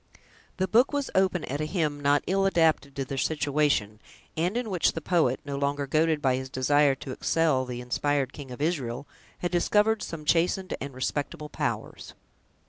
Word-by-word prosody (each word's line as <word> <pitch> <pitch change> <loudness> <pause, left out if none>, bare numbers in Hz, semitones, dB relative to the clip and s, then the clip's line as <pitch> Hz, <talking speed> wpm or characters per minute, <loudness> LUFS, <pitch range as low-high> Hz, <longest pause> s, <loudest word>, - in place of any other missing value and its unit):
The 190 - 0
book 240 +6 +4
was 285 -2 -2
open 190 -3 +2
at 140 +3 -3
a - - 0
hymn 155 -3 -1
not 145 0 +2
ill 195 +1 +2
adapted 160 -6 +2
to 135 - -2
their 135 +1 -4
situation, 145 -9 0 0.4
and 175 +7 0
in 240 -4 -3
which 180 -3 +2
the - - -3
poet, 155 -6 +1
no 140 -1 -4
longer 140 0 -1
goaded 155 +2 +1
by 130 -2 +3
his 130 0 -5
desire 140 +2 +3
to 135 0 -8
excel 150 -2 +1
the 125 -1 -5
inspired 135 +2 -1
King 145 -3 -9
of 125 +3 -5
Israel, 140 -5 -2 0.4
had 175 - -1
discovered 210 +5 +2
some 155 -2 -6
chastened 180 +4 +1
and 135 -1 -6
respectable 145 +3 -3
powers. - - -4
150 Hz, 180 wpm, -27 LUFS, 135-175 Hz, 0.4 s, book